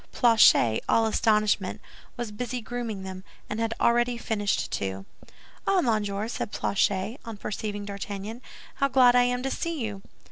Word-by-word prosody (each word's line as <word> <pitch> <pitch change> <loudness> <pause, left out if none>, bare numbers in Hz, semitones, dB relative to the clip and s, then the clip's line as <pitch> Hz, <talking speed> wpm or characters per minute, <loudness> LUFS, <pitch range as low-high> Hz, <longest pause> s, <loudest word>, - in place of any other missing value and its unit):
Planchet, 220 - +5
all 225 - +4
astonishment, 215 -3 +1 0.4
was 240 -3 -4
busy 245 +3 -4
grooming 230 -4 -5
them, 190 0 -7 0.2
and 210 - -4
had 225 0 0
already 240 +1 +2
finished 205 -3 -1
two. 95 0 -3 0.6
"Ah, 390 -1 +4
monsieur," 215 -5 0
said 230 - -4
Planchet, 200 +5 0
on 230 -3 -7
perceiving 205 0 -4
D'Artagnan, 200 +3 -6 0.4
"how 275 - +3
glad 255 -2 +5
I 245 0 +5
am 245 0 -1
to 270 - -1
see 335 -2 -3
you." 210 -5 -4
220 Hz, 150 wpm, -27 LUFS, 200-245 Hz, 0.6 s, Planchet